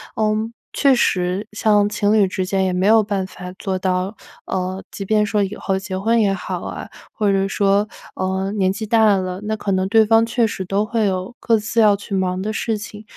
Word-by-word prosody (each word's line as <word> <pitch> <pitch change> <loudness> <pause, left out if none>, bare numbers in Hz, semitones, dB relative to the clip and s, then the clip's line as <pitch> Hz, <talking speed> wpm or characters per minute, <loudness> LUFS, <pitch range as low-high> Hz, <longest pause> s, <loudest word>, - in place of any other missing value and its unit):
嗯， 215 +1 0 0.2
确 275 -2 +3
实 185 -3 0
像 210 -1 +2
情 210 0 +1
侣 210 -3 +4
之 185 0 -2
间 190 +1 0
也 190 - +1
没 180 +1 0
有 220 +2 +6
办 200 -2 -2
法 180 -1 -9
做 190 -2 -3
到， 185 +2 -1 0.3
呃， 185 +1 -3
即 200 - -6
便 210 +1 +2
说 210 0 0
以 195 +1 -4
后 190 -1 -2
结 190 -1 -5
婚 225 +4 +2
也 200 -2 +3
好 195 - -4
啊。 - - -6 0.2
或 210 -3 0
者 195 0 +1
说， 200 +1 +2 0.3
呃， 190 +1 -2
年 195 -3 +1
纪 210 +3 -4
大 220 -1 +4
了， 185 -1 -3
那 220 +1 -1
可 205 - -3
能 190 0 +1
对 220 +1 +5
方 225 +1 +4
确 230 0 +1
实 205 -3 -3
都 200 +3 0
会 225 0 0
有 185 +4 -3
各 230 -2 +2
自 215 +2 -2
要 210 -2 +5
去 200 0 -8
忙 185 -1 0
的 215 +2 -3
事 220 0 -1
情， 210 +1 -9
200 Hz, 235 characters per minute, -20 LUFS, 190-215 Hz, 0.3 s, 有